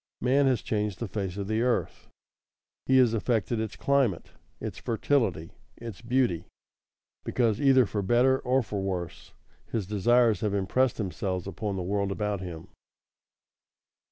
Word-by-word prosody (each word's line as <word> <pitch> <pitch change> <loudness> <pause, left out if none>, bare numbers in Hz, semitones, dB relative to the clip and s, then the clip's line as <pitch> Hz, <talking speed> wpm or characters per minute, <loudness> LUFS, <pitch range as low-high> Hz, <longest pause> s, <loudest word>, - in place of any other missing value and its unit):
Man 135 +3 +3
has 125 -4 +1
changed 105 -3 -1
the 115 - -4
face 95 -1 -4
of 100 -1 -4
the 110 +1 0
earth; 125 0 -1 0.8
he 130 - +5
has 125 -3 +5
affected 115 0 0
its 110 -1 -3
climate, 135 -10 +1 0.3
its - - -6
fertility, 110 - 0 0.3
its 115 -4 -8
beauty, 120 -7 0 0.8
because, 115 -3 0
either 135 -3 +5
for 105 0 -2
better 125 +6 +3
or 130 +1 +1
for 100 -2 -4
worse, 90 -3 -5 0.4
his 110 -4 -1
desires 110 +2 +3
have 105 -2 0
impressed 120 +6 +1
themselves 95 -3 -3
upon 100 +1 -4
the 95 - -3
world 100 +1 -1
about 105 0 -2
him. 85 -3 -8
110 Hz, 145 wpm, -28 LUFS, 95-125 Hz, 0.8 s, he